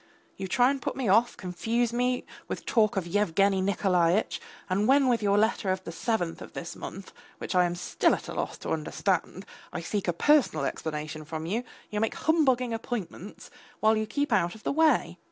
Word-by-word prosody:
You 195 - -5
try 245 +7 +4
and 275 -1 -4
put - - -3
me 260 -4 -2
off, 225 +5 +3
confuse 225 +6 -1
me 250 +1 0 0.2
with - - -5
talk 215 -3 +2
of 190 - 0
Yevgeny 195 +1 +2
Nikolaitch, 185 -1 +1 0.3
and 200 +3 +1
when 275 +1 +5
with 240 -2 +2
your 200 -1 +2
letter 215 -2 +2
of 185 0 -2
the 165 - -6
seventh 175 -1 -2
of - - -10
this 170 - -6
month, 195 +1 -8 0.2
which - - -5
I 180 -1 +4
am 175 0 -2
still 175 - +1
at - - -9
a - - -5
loss - - -3
to - - -4
understand, 180 +4 -1 0.3
I - - -4
seek 200 +4 -3
a 175 - +2
personal 245 - +3
explanation 155 +1 -4
from 160 +1 -5
you, 220 +8 -1 0.3
you 210 - -1
make 225 - 0
humbugging 260 -7 +2
appointments, 215 -4 -6 0.3
while 220 +1 +4
you 215 0 -1
keep 285 +5 -1
out 175 -1 +2
of 220 - -14
the - - 0
way. 315 +2 +2
205 Hz, 200 wpm, -28 LUFS, 175-240 Hz, 0.3 s, when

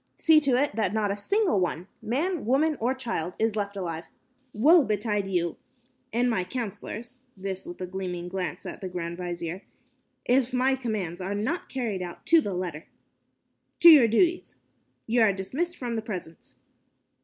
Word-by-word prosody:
See 320 -2 +6
to 265 -4 +2
it 285 -6 0
that 215 -2 0
not 210 -2 +1
a - - -1
single 385 - +1
one 180 0 -1
man, 290 - -1
woman, 300 +5 +3
or 245 +4 0
child 225 -10 -3
is 220 -1 +1
left 200 -1 -3
alive. 165 -3 -4 0.4
Woe 300 +10 +6
betide 210 -2 -1
you, 175 -3 -1 0.5
and 240 +2 +1
you - - +2
my 185 -5 0
counselors" 235 +3 -6 0.2
this 190 0 -5
with 175 - -8
a - - -1
meaning 180 -2 -4
glance 180 -3 -4
at - - -7
the 190 - -4
grand 170 -1 -4
vizier 175 0 -4 0.6
"if 255 0 +2
my 260 +1 +3
commands 210 -9 -3
are 195 +2 -3
not 260 - -2
carried 230 -8 -2
out 175 -1 -7
to 330 -1 +6
the 200 -9 -3
letter. 175 -4 -4 0.9
To 340 - +11
your 290 -8 +9
duties. 340 - +1 0.5
Ye 235 +2 +1
are 220 -3 +5
dismissed 275 - -3
from 245 -2 -4
the 225 - -1
presence." 185 -7 -8
215 Hz, 175 wpm, -27 LUFS, 185-260 Hz, 0.9 s, To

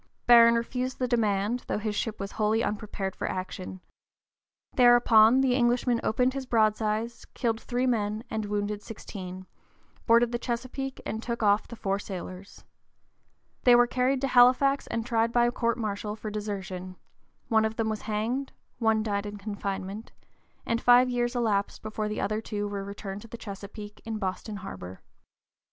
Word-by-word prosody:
Barron 235 -1 +8
refused 250 +2 -2
the 255 - 0
demand, 220 -1 +1
though - - -1
his 215 0 -2
ship 220 +1 -2
was 195 0 -4
wholly 220 +1 +1
unprepared 205 -3 -3
for - - -3
action. 185 0 -5 0.9
Thereupon 240 -1 +6
the 260 -2 +3
Englishman 245 -1 +2
opened 250 +3 +1
his 270 -1 -5
broadsides, 220 0 0
killed 230 -3 -1
three 250 +1 -1
men 215 -3 0
and 220 -1 -3
wounded 205 0 -2
sixteen, 185 -4 -8 0.6
boarded 235 0 +5
the 240 - -2
Chesapeake 255 +3 -4
and 220 - -3
took 235 -1 -3
off 205 0 +3
the 235 - -8
four 195 -3 -1
sailors. 185 -1 -8 1.0
They 245 -1 +7
were 240 0 +6
carried 255 +2 0
to 275 - +1
Halifax 260 +2 +5
and 230 -1 -3
tried 230 -1 +1
by 240 0 +4
court 235 -1 0
martial 210 -2 -3
for 215 -1 -6
desertion: 190 -3 -5 0.5
one 220 -2 +3
of 220 0 -1
them 225 -1 -1
was 215 -1 -2
hanged; 235 +6 -2 0.3
one 220 -2 +2
died 205 -1 -2
in 205 0 -7
confinement, 200 0 -5 0.5
and 230 0 0
five 245 +1 +6
years 240 0 0
elapsed 210 -4 0
before 215 0 -3
the 210 - -3
other 215 +1 -1
two 205 -2 -3
were 200 -1 -4
returned 200 0 -7
to 230 - -12
the 235 - -8
Chesapeake 205 0 -9
in 225 -1 -4
Boston 205 +2 -4
harbor. 95 - -8
220 Hz, 165 wpm, -28 LUFS, 205-240 Hz, 1.0 s, Barron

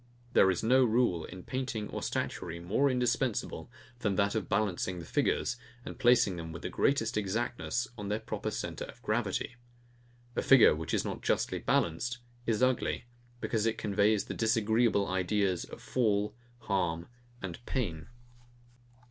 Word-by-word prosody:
There 95 - +6
is 90 +1 0
no 130 +4 +5
rule 110 -8 +2
in 90 -1 -9
painting 125 -5 -3
or - - -4
statuary 85 -1 -3
more 105 +11 +2
indispensible 125 -2 0 0.3
than 105 -5 0
that 100 0 +2
of 110 -6 -2
balancing 95 -3 0
the 85 - -7
figures, 120 - 0 0.3
and - - -8
placing 120 -6 +4
them 80 -1 -6
with 80 - -8
the - - -2
greatest 115 -5 +1
exactness 120 +4 -1
on 100 - -4
their 105 +2 0
proper 110 - -4
centre - - -4
of - - -13
gravity. 110 +1 -1 0.8
A - - +1
figure, 135 -4 +7
which 80 +1 -2
is - - 0
not - - -4
justly - - 0
balanced, 115 +10 0 0.3
is 115 +1 +2
ugly; 130 -1 +1 0.4
because 115 -1 0
it 115 - 0
conveys 105 0 +2
the - - -5
disagreeable 110 -1 +2
ideas 95 0 0
of - - -10
fall, 105 -4 +1 0.3
harm, 85 -5 -1 0.4
and 95 +4 -6
pain. 85 - -2
105 Hz, 155 wpm, -31 LUFS, 95-120 Hz, 0.8 s, figure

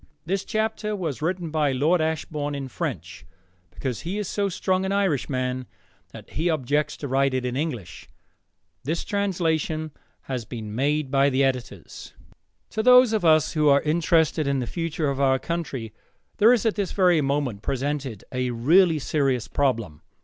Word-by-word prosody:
This 190 +3 -1
chapter 220 -1 -2
was 160 - -4
written 170 0 -2
by 150 -3 +1
Lord 155 +7 +2
Ashbourne 150 -2 -2
in 135 -2 -5
French, - - -5 0.5
because 125 +6 -4
he 180 +5 -4
is 210 -3 -3
so 200 +1 -1
strong 185 +1 0
an 190 - -1
Irishman 130 - -1 0.4
that - - -12
he 165 +5 -1
objects 150 0 0
to 145 - -5
write 135 0 +1
in 125 -1 -2
English. 120 - -5 0.7
The 155 +5 -1
translation 165 -6 -1 0.3
has 130 -3 -4
been 110 -2 -7
made 140 +3 0
by 140 0 +4
the 135 0 +2
Editors.] 130 -3 -4 0.6
To 220 - -1
those 250 0 +6
of 215 -4 0
us 155 -2 +4
who 150 -2 +3
are 140 0 +4
interested 160 -1 +2
in 140 0 +1
the 125 - -1
future 165 0 -2
of 140 0 -1
our 135 -1 +4
country 135 -9 -4 0.4
there 220 +3 +6
is 240 -2 +2
at 220 - +3
this 200 -3 -3
very 180 -5 +4
moment 135 -7 -1
presented 135 -4 -3
a 125 -1 -1
really 160 +9 +4
serious 135 -5 0
problem. 115 - -1
150 Hz, 165 wpm, -24 LUFS, 130-175 Hz, 0.7 s, those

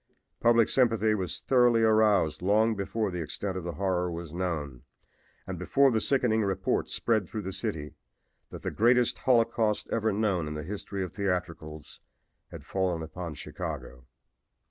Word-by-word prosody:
Public 115 -1 +4
sympathy 115 -4 +2
was 95 -5 -3
thoroughly 120 -3 +4
aroused 105 -8 +3
long 110 +4 +3
before 100 +1 -2
the 90 -1 -4
extent 95 +5 -4
of 95 - -4
the 85 0 -4
horror 90 0 0
was 85 -2 -7
known 80 -8 -3 0.6
and 95 -3 -6
before 135 - +3
the 110 -2 +1
sickening 125 -5 +2
report 95 -2 -1
spread 110 -5 0
throughout 110 - -5
the 95 - -4
city 75 -5 -4 0.6
that - - -10
the - - -2
greatest 120 +2 +3
holocaust 115 -3 +2
ever 110 -1 +1
known 100 -6 0
in 75 - -5
the 75 - -4
history 100 +2 -5
of 90 -2 -6
theatricals 85 -6 -4 0.5
had - - -10
fallen 90 -4 -1
upon 85 0 -6
Chicago. 60 -3 -7
95 Hz, 155 wpm, -28 LUFS, 85-110 Hz, 0.6 s, Public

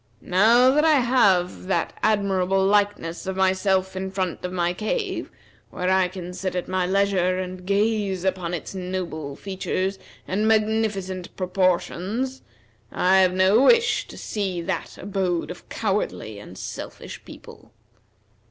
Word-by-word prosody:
Now 230 +7 +5
that 300 +3 +3
I 320 -1 +5
have 195 -8 +2
that 190 - 0
admirable 195 -3 +2
likeness 200 -4 0
of 190 - -2
myself 190 0 +1
in 190 0 -3
front 190 -3 -3
of 180 - -3
my 175 -1 0
cave, 375 - -3 0.4
where 180 +1 -1
I 190 -1 +4
can 180 -1 -8
sit 185 0 -4
at 180 - -2
my 185 -1 0
leisure, 190 -1 +2
and 185 0 -6
gaze 200 -2 +1
upon 180 -2 -1
its 165 - -7
noble 180 -6 -4
features 190 +1 -3 0.3
and 210 +4 0
magnificent 215 -4 0
proportions, 190 +7 -1 0.5
I 190 +1 +3
have 185 -1 +4
no 190 +5 +4
wish 460 - +4
to - - -11
see 195 -4 -3
that 175 -1 -4
abode 185 -4 -2
of 180 - -12
cowardly 195 - -2
and 95 -2 -11
selfish - - -8
people." - - -13
190 Hz, 140 wpm, -24 LUFS, 180-205 Hz, 0.5 s, Now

